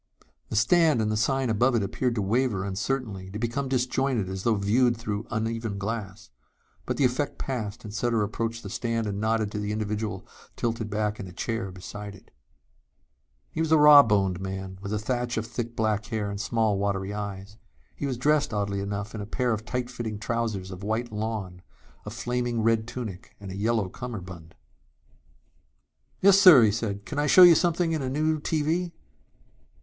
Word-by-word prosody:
The - - -4
stand 155 +5 +4
and 110 -1 0
the - - 0
sign 130 +3 +1
above 120 +4 +2
it 110 - +2
appeared 120 +5 -1
to 105 - -1
waver 110 -2 0
uncertainly, 100 -1 -3
to 100 - -6
become 120 +4 -2
disjointed 130 -4 0
as 95 0 -4
though 115 +2 +2
viewed 115 +4 +2
through 105 -1 -4
uneven 115 -2 -2
glass. 105 +1 -5 0.6
But - - -2
the 140 - +3
effect 130 +4 -1
passed 115 -5 -4
and 105 -2 -8
Sutter 115 -1 +1
approached 115 +2 -3
the 100 - -6
stand 115 0 -1
and 100 -1 -3
nodded 110 -1 0
to 105 - -4
the 105 0 -3
individual 105 -1 -3 0.3
tilted 115 -2 -2
back 105 0 -1
in 95 - -6
a - - -10
chair 115 +2 -3
beside 100 +2 -8
it. - - -19 1.2
He 160 - -2
was 160 -1 -1
a 160 - +7
rawboned 110 -12 +6
man 95 0 -6
with 100 0 -5
a 105 - 0
thatch 120 +2 -2
of 110 - -1
thick 120 0 -5
black 110 -1 0
hair 105 -3 -2
and 100 0 -4
small 110 -2 +1
watery 100 0 -1
eyes. 100 0 -6 0.4
He 140 - -3
was 130 -3 -2
dressed, 145 -2 +1
oddly 100 -1 -1
enough, 100 +1 -4
in 110 - -5
a 100 - -6
pair 125 +1 0
of 110 0 -4
tight 125 0 -2
fitting 115 -4 -4
trousers 110 -4 -3
of 95 0 -8
white 110 +4 -2
lawn, 105 -4 -4 0.5
a - - -2
flaming 120 0 -2
red 115 -1 +2
tunic 110 -7 -7
and 100 -2 -8
a - - -6
yellow 110 0 0
cummerbund. 90 -7 -8 1.7
"Yes, 195 0 +7
sir," 175 -11 +9
he 110 - +4
said. 100 -1 -3
"Can 145 - -4
I 150 - +1
show 185 - +8
you 175 -1 +10
something 170 0 +1
in 160 -2 -1
a 130 - -2
new 155 +3 0
TV?" 165 +3 -1
110 Hz, 185 wpm, -26 LUFS, 100-125 Hz, 1.7 s, you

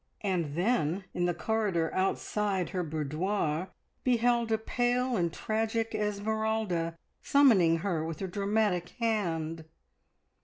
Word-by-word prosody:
And 175 -7 -1
then, 180 -2 +1
in 175 - 0
the 175 - +1
corridor 185 -3 0
outside 195 0 0
her 185 - -2
boudoir, 160 +2 -1 0.4
behold 240 -2 +2
a 220 - +3
pale 245 +2 0
and 170 -4 +1
tragic 225 +3 -1
Esmeralda 210 -4 -1 0.2
summoning 205 -13 +5
her 170 -5 0
with 160 -1 -5
a - - -1
dramatic 200 -2 0
hand. 165 -8 -1
195 Hz, 115 wpm, -30 LUFS, 170-220 Hz, 0.4 s, summoning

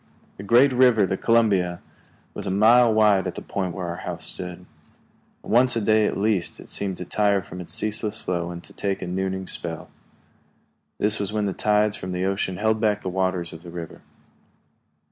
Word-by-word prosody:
The 100 - -8
great 125 +6 +5
river, 125 -5 +5
the 95 - -1
Columbia, 100 -7 +2 0.5
was - - -5
a - - 0
mile 115 +5 +5
wide 105 -3 +3
at 90 - -5
the - - -6
point 95 -3 -3
where 95 -2 -4
our 85 0 -4
house - - -5
stood. 90 0 -6 0.8
Once 120 +2 +3
a - - +1
day 110 0 +3
at - - -2
least 100 -4 -1
it - - -12
seemed 95 -2 -2
to 90 - -6
tire 100 0 +1
from 90 +1 -9
its 85 -1 -8
ceaseless 110 0 -2
flow 85 -1 -2
and 85 0 -8
to - - -13
take 100 -2 -3
a - - -3
nooning 95 +1 -2
spell. 85 -2 -3 1.1
This 105 0 +1
was 100 0 -2
when 105 -1 -1
the 100 - -1
tides 105 +1 +1
from 90 -2 -6
the 90 +1 -1
ocean 95 -1 -1
held 110 +1 +1
back 105 -2 +1
the 95 - -2
waters 95 -2 -1
of 80 - -10
the 85 - -11
river. 85 -1 -8
100 Hz, 200 wpm, -24 LUFS, 90-110 Hz, 1.1 s, great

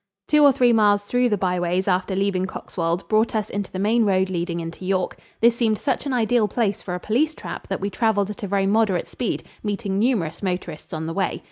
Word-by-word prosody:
Two 300 -1 +5
or 285 - +8
three 245 -2 +3
miles 205 -2 +4
through 245 +4 +1
the 210 - +1
byways 180 0 0
after 185 0 +1
leaving 190 -1 0
Coxwold 170 -1 -3
brought 220 +1 +2
us 215 -1 -1
into 200 -1 -4
the - - -5
main 220 +4 +2
road 190 -2 +2
leading 170 -1 -2
into 165 +2 -7
York. 185 -1 -1 0.2
This 235 0 +5
seemed 225 -3 +1
such 285 - -2
an - - -1
ideal 235 -2 +2
place 205 -1 -1
for 180 - -4
a - - -4
police 290 - 0
trap - - -7
that - - -3
we 200 +1 -3
traveled 210 -2 +1
at 210 - -10
a 200 - -3
very 195 0 +1
moderate 200 -3 +2
speed, 245 - -3 0.2
meeting 205 -2 -2
numerous 200 -9 0
motorists 180 -5 -4
on 160 0 -4
the 165 - -3
way. 195 +1 -1
200 Hz, 225 wpm, -23 LUFS, 185-225 Hz, 0.2 s, or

